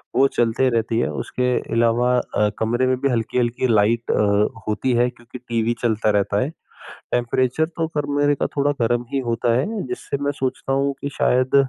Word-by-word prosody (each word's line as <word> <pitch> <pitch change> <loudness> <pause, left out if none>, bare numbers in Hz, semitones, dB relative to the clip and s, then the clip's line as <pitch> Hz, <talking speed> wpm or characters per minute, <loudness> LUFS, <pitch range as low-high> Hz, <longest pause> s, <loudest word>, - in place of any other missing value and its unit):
वो 135 +2 +5
चलते 120 0 +1
रहती 115 -1 0
है। - - 0
उसके 125 0 -2 0.2
अलावा 120 +2 +3
अ, 105 -3 0
कमरे 120 +3 +1
में 130 - +1
भी 140 - +2
हल्की-हल्की 120 +1 0
लाइट 115 +1 +2
अ, 105 +1 +1
होती 110 +4 0
है 120 +1 +3
क्योंकि 120 0 -12
टीवी 115 0 0
चलता 110 -2 +1
रहता 100 0 +1
है। 130 - -1 0.6
टेंपरेचर 125 +5 +1
तो 165 -1 -3
कमरे 145 0 +1
का - - -1
थोड़ा 145 +1 +2
गर्म 120 +1 +1
ही 135 - +1
होता 115 0 +1
है 205 - -2
जिससे 370 - -4
मैं 145 - +1
सोचता 130 +1 -2
हूँ 140 +1 +1
कि 140 - -3
शायद 130 +2 +2
125 Hz, 180 wpm, -21 LUFS, 115-135 Hz, 0.6 s, वो